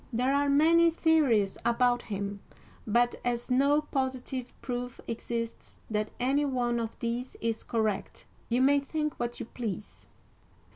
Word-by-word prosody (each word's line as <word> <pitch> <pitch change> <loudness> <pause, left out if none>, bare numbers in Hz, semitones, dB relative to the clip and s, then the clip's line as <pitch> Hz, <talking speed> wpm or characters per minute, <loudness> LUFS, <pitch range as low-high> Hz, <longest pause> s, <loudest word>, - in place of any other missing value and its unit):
There 250 +3 +1
are 285 0 +2
many 330 +4 +5
theories 295 - +2
about 245 +1 +3
him, 200 -1 -4 0.5
but 240 +3 +2
as 240 +1 -2
no 280 +4 +4
positive 260 -3 -3
proof 245 -1 -4
exists 230 0 -4
that 215 0 0
any 270 +4 +2
one 245 -4 0
of 225 -1 -4
these 240 +2 -3
is 225 -1 -1
correct, 220 -4 -2 0.2
you 245 +2 +3
may 285 +1 +5
think 300 +1 -2
what 240 0 -3
you - - -4
please. 215 -4 -6
245 Hz, 140 wpm, -29 LUFS, 230-275 Hz, 0.5 s, many